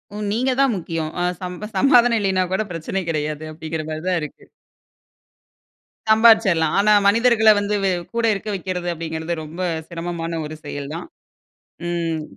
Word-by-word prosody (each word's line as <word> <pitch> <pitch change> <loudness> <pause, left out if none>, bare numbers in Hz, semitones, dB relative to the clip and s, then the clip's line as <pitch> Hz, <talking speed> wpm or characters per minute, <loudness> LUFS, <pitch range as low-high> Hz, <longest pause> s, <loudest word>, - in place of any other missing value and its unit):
ம். 210 - -5
நீங்க 250 +5 +1
தான் 275 -3 +4
முக்கியம். 165 -3 -4
அ - - +1 0.2
சம்ப 180 +3 -6
சமாதானம் 245 -1 +5
இல்லையினாக்கூட 190 0 0
பிரச்சனை 170 +3 -3
கெடையாது. 155 -1 -2
அப்பிடிங்கிற 160 0 -5
மாரிதான் 170 +3 -1
இருக்கு. 150 - -8 1.7
சம்பாரிச்சிறலாம். 220 -8 +5
ஆனா 210 +1 +4 0.2
மனிதர்கள 225 +1 +4
வந்து 205 +1 -1
வெ 195 - +2 0.2
கூட 235 0 +1
இருக்க 205 +2 -5
வக்கிறது 180 -1 -4
அப்படிங்கிறது 160 0 -4
ரொம்ப 160 +4 -8 0.3
சிரமமான 165 -1 -4
ஒரு 155 - -8
செயல் 145 0 -6
தான். 170 - -7 0.8
ம். 165 -2 -2
180 Hz, 135 wpm, -21 LUFS, 160-210 Hz, 1.7 s, சமாதானம்